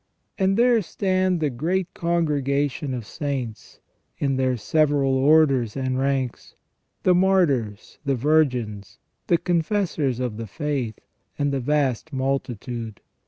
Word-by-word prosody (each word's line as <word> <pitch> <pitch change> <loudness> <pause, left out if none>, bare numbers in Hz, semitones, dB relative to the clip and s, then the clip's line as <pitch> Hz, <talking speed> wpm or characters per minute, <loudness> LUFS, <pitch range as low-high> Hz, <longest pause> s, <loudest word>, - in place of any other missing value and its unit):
And 195 +1 +2
there 240 -1 +4
stand 185 -2 0
the 150 -2 +1
great 175 +8 -1
congregation 145 -5 0
of 120 -3 -6
saints, 130 -5 -5 0.4
in 135 -2 0
their 130 -1 +1
several 145 +2 +2
orders 135 -4 +3
and 130 -1 -1
ranks: 135 -2 -2 0.5
the 185 - +5
martyrs, 165 - +1
the 140 -2 +1
virgins, 125 -8 0 0.3
the 170 - +4
confessors 165 - 0
of 125 -4 -3
the 115 -1 -5
faith, 135 - -3 0.4
and 145 0 0
the 140 - 0
vast 140 +1 0
multitude. 125 -4 -3
140 Hz, 120 wpm, -24 LUFS, 125-160 Hz, 0.5 s, the